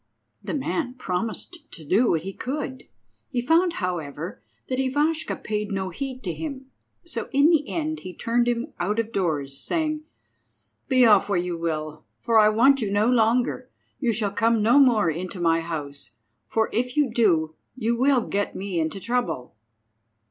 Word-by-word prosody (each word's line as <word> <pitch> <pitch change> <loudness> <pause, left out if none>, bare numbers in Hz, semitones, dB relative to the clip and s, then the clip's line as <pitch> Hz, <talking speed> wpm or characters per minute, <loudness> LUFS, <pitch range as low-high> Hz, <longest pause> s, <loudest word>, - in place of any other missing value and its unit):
The - - -3
man 265 -2 -2
promised 230 - -4
to 160 - -10
do 215 - +3
what 160 -1 +1
he 195 +1 -5
could. 260 +1 -5 0.4
He 255 - -1
found, 330 +8 +3
however, 170 - -4 0.3
that 255 0 -2
Ivashka 295 +5 0
paid 210 0 -3
no 190 -1 -2
heed 260 +6 -5
to 175 -4 -2
him, 270 - -7 0.3
so 340 - -5
in 285 +4 +5
the 300 -4 +2
end 315 -1 -2
he 185 - -8
turned 235 +5 0
him 240 +4 -1
out 200 +5 0
of 230 0 -1
doors, 145 -9 -1
saying— 310 -2 -1 0.9
"Be 255 -3 +5
off 205 -3 +5
where 200 - +2
you 175 0 -1
will, 155 -2 -4 0.2
for 230 - +3
I 215 0 +6
want 265 +5 +4
you 205 -3 -1
no 205 +1 +2
longer; 240 +1 +2 0.3
you 245 -4 +1
shall 210 -2 0
come 225 +1 +2
no 235 +6 +5
more 235 -9 +5
into 180 +3 -3
my 165 -1 +3
house, 150 -4 -5 0.4
for 220 0 +1
if 250 +4 -1
you 280 -6 +2
do 165 -9 +2 0.2
you 235 -2 0
will 260 +1 +3
get 200 0 -2
me 190 -3 -3
into 160 +4 -2
trouble." 235 - -2
225 Hz, 170 wpm, -24 LUFS, 180-260 Hz, 0.9 s, I